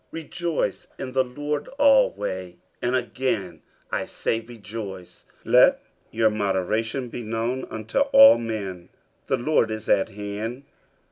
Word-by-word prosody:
50:004:004 165 - -6
Rejoice 170 0 -2
in 130 -1 -5
the 130 0 +2
Lord 145 +3 -4
alway: 105 - +2 0.3
and 120 +1 0
again 120 -8 -2 0.3
I - - -1
say, 115 - -2
Rejoice. 105 -5 -9 0.2
50:004:005 - - -6
Let - - +6 0.3
your 110 -1 +2
moderation 110 +5 -1
be 120 - -6
known 115 +3 -2
unto 110 - -3
all 275 0 +8
men. 100 -6 -5 0.4
The - - +1
Lord 120 -3 +2
is 110 0 -5
at 95 - +3
hand. 105 +5 -5
115 Hz, 135 wpm, -24 LUFS, 105-130 Hz, 0.4 s, all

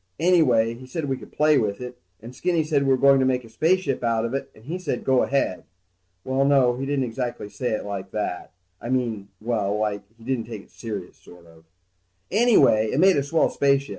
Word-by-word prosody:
Anyway 130 -11 +3
he 130 +2 -12
said 160 +3 -4
we 135 -1 -1
could - - -13
play 150 0 +3
with 100 -2 -2
it, 125 0 -8 0.2
and 120 +2 -10
Skinny 170 +1 0
said 150 -2 +1
we 135 - 0
were 130 - +4
going 140 0 +5
to 130 - +2
make 130 -1 +1
a 115 - -14
spaceship 160 0 0
out 115 -1 +1
of 115 - -4
it, 135 - -3
and 110 - -18
he 170 +6 -4
said 145 -9 -3
go 130 -1 +3
ahead. 135 -9 0 0.6
Well, 130 +1 0
no, 135 -3 +4
he 135 +1 -4
didn't 140 -1 0
say - - -1
it 125 +1 -2
exactly 110 +2 -3
like 100 -2 -5
that. 105 -4 -4 0.3
I 120 - -6
mean, 115 -6 -1
well, 105 -3 -1
like 105 -1 -1 0.2
he 115 - -17
didn't 125 -2 -2
take 110 -3 -8
it - - -25
serious, 105 -6 -7
sort 90 -1 -17
of. 80 -1 -19 0.7
Anyway, 210 - +4
it 135 - 0
made 190 +2 +6
a 140 - +2
swell 150 +4 +1
spaceship. 140 0 +1
125 Hz, 225 wpm, -24 LUFS, 110-140 Hz, 0.7 s, made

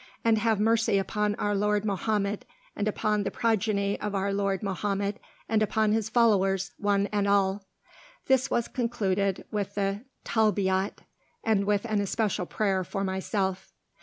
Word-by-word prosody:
And 225 -1 +4
have 220 -1 +1
mercy 225 -1 +3
upon 210 +2 0
our 205 0 -1
lord 210 +1 +1
Mohammed, 205 0 -1 0.3
and 205 - -1
upon 210 0 0
the 195 - -1
progeny 205 -2 0
of 210 -1 -3
our 195 +1 0
lord 195 -1 0
Mohammed, 200 +1 -2 0.3
and 220 -1 +2
upon 215 0 +2
his 220 0 0
followers, 195 -5 +2
one 200 -1 +2
and 205 -1 +1
all!" 200 0 +2 0.6
This 265 0 +3
was 235 - 0
concluded 200 -6 -1
with 200 -1 -3
the 200 0 -1 0.2
"Talbiyat," 200 -3 +1 0.4
and 215 -3 +2
with 205 +1 +1
an 215 -3 0
especial 200 -3 -1
prayer 195 -3 0
for 195 +2 -3
myself. 190 0 -2
205 Hz, 150 wpm, -27 LUFS, 195-215 Hz, 0.6 s, And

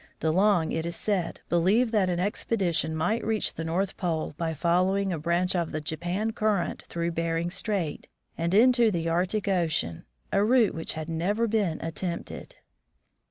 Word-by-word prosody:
De 160 - +1
Long, 185 -2 +3
it 160 - -1
is 170 +1 -4
said, 185 -4 -2
believed 200 +8 +3
that 205 -5 +2
an 175 -1 -1
expedition 180 -5 0
might 190 +9 0
reach 220 -1 0
the 160 - -5
North 180 +4 -1
Pole 165 -5 -2
by 165 0 -2
following 185 +4 +1
a 165 - -3
branch 175 +4 0
of 170 -2 -1
the 155 - -2
Japan 175 +8 -2
Current 210 -5 0
through 170 0 -2
Bering 165 +1 -1
strait 195 -5 -2 0.3
and 170 +3 0
into 240 +1 +5
the 170 -4 -2
Arctic 180 +5 0
ocean, 160 - 0 0.3
a 200 - +3
route 235 0 +4
which 160 - -2
had 160 0 -5
never 190 +8 0
been 205 -7 0
attempted. 170 +1 -5
175 Hz, 165 wpm, -27 LUFS, 165-205 Hz, 0.3 s, into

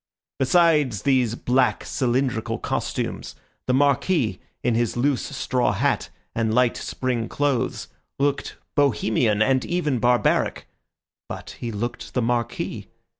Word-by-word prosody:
Besides 150 - +3
these 130 -4 +2
black, 125 +1 +1
cylindrical 125 -2 0
costumes, - - -3 0.3
the 125 - +2
Marquis, 140 - +2 0.2
in 120 - +2
his 120 +1 0
loose 135 +1 +2
straw 125 -5 0
hat 95 - 0 0.2
and 110 -1 0
light 125 +1 +3
spring 125 -3 -2
clothes, 135 -4 -1 0.3
looked 140 0 -1 0.2
Bohemian 110 -6 +2
and 130 +2 +2
even 155 -8 0
barbaric; 120 +2 +2 0.6
but - - -7
he 120 - -4
looked 115 +3 -5
the 125 - +2
Marquis. 120 0 -2
125 Hz, 120 wpm, -24 LUFS, 115-140 Hz, 0.6 s, Besides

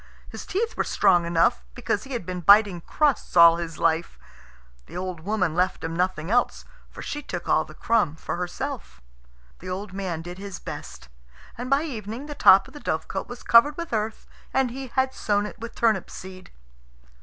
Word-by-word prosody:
His - - -9
teeth 455 +4 -1
were - - 0
strong 175 -2 +3
enough, 165 - +2
because 205 - -2
he 270 - -7
had 235 -8 -3
been 180 0 -4
biting 200 -1 +5
crusts 285 - 0
all 170 0 +8
his 165 -2 -5
life. 165 0 0 0.7
The - - -8
old 180 -2 -4
woman 185 -1 -1
left 180 +2 0
him 165 0 -3
nothing 180 -1 -1
else, 245 +1 +1 0.2
for - - -10
she 295 - -4
took - - -6
all - - +3
the - - -14
crumb 215 -10 +1
for - - -5
herself. 180 - -5 0.6
The 185 - -8
old 190 +1 -5
man 180 -4 -4
did 175 +2 -8
his 195 -2 -7
best, - - -9 0.5
and 245 +2 -6
by 275 +2 +3
evening 230 -3 -6
the 295 - -6
top 195 -8 +6
of - - -16
the 295 - -9
dovecot 160 - -3
was 245 0 -9
covered 280 +6 +5
with 340 -6 -5
earth, 215 0 -2 0.3
and 265 -2 +1
he 265 +2 -6
had 260 +1 0
sown 205 -3 0
it 210 - -8
with 230 +1 -8
turnip 220 -5 +1
seed. 185 0 -10
200 Hz, 190 wpm, -25 LUFS, 175-245 Hz, 0.7 s, all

